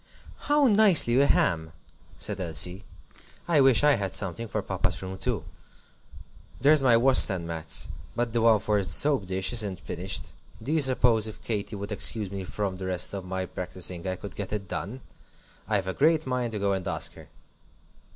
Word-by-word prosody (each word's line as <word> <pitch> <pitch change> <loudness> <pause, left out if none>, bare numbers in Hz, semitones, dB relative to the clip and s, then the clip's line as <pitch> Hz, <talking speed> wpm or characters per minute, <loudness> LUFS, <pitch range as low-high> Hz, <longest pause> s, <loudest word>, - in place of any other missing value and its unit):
"How 295 -1 +4
nicely 200 - +6
you 125 - +4
hem!" 80 - +1 0.4
said - - -4
Elsie. 90 +3 0 0.6
"I 160 -4 +4
wish 135 -1 +4
I 145 -3 +5
had 95 -3 -3
something 100 +4 -3
for - - -3
Papa's - - -2
room 95 0 -6
too. 95 - -2 1.2
There's 145 +3 +5
my 125 -3 +5
washstand 115 -8 +4
mats 80 -1 -3 0.3
but 120 -1 -2
the 120 - +1
one 115 -2 +5
for 105 0 0
the 95 - -6
soap 135 0 0
dish 95 +4 -1
isn't 105 -6 0
finished. 90 +3 -4 0.3
Do 125 +7 -3
you 160 - +2
suppose, 125 -5 +2
if 110 - -10
Katy 105 -1 -3
would 100 +1 -7
excuse 105 -1 +2
me 100 -1 -5
from 95 0 -4
the 95 0 -5
rest 90 0 -2
of 100 -2 -5
my 95 0 -3
practising, 90 0 -4
I 95 - -2
could 100 +2 -9
get 100 -2 -5
it 105 -3 -4
done? 125 +8 -5 0.7
I've 100 -3 0
a 95 - -3
great 160 - +2
mind 125 -3 -2
to - - -3
go 100 0 +1
and 95 -2 -4
ask - - -3
her." - - -15
105 Hz, 185 wpm, -26 LUFS, 95-125 Hz, 1.2 s, nicely